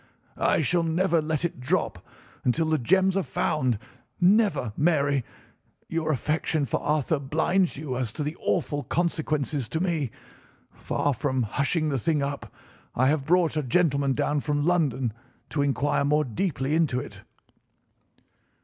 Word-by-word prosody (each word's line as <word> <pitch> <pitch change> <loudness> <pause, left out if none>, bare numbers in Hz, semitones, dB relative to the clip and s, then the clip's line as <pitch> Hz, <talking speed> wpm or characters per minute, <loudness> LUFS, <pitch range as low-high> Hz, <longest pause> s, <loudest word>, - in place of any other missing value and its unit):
"I - - +3
shall 175 -1 +2
never 165 +1 +1
let 155 +1 -1
it 170 - -4
drop 125 - -1 0.4
until 155 +6 +1
the 155 0 +1
gems 190 +8 +3
are 195 - +2
found—never, 140 - 0
Mary! 145 -4 +2 0.7
Your 160 -1 -1
affection 155 +1 0
for 120 - -2
Arthur 150 0 +1
blinds 160 +6 +1
you 140 -3 -4
as 125 -4 -1
to 150 - -3
the 150 +2 -3
awful 145 -4 -1
consequences 155 -6 -1
to 160 - -2
me. 165 -7 0 0.6
Far 145 - -1
from 130 -1 -1
hushing 145 - 0
the 135 -3 0
thing 150 +2 +1
up, 140 0 -4 0.4
I 130 +2 +3
have 145 -2 0
brought 175 -2 +3
a 155 - +1
gentleman 140 -1 +2
down 145 +3 0
from 145 0 -1
London 145 -9 +1 0.4
to 145 - 0
inquire 145 +1 +1
more 150 +2 +2
deeply 135 - -2
into 155 -6 +2
it." 105 -8 -9
150 Hz, 145 wpm, -26 LUFS, 135-165 Hz, 0.7 s, I